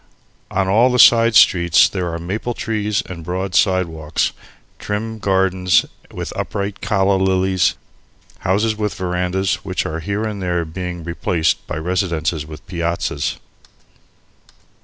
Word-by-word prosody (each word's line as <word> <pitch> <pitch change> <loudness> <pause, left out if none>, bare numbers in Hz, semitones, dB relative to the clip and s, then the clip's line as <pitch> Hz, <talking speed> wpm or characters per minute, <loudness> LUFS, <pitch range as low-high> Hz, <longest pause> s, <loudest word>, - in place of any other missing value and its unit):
On 95 0 0
all 115 +6 +4
the 125 - +1
side 115 -2 +6
streets 85 -4 +6
there 90 -3 -3
are 85 - -3
maple 105 +8 -4
trees 105 -2 -1
and 85 -3 -8
broad 90 +2 -3
sidewalks, 80 -1 +1 0.5
trim 110 +2 -4
gardens 95 -2 +2 0.3
with - - -6
upright 100 0 -4
calla 100 -1 +2
lilies, 95 -2 +2 0.6
houses 105 +4 +1
with 105 -1 -2
verandahs, 90 0 -1
which - - -2
are 80 +1 -3
here 100 +5 -3
and 105 -3 -4
there 90 -2 -1
being 90 +1 -6
replaced 85 -1 -1
by 75 - -4
residences 85 -2 -1
with 75 -1 -11
piazzas. 85 -1 -2
95 Hz, 130 wpm, -19 LUFS, 85-100 Hz, 0.6 s, side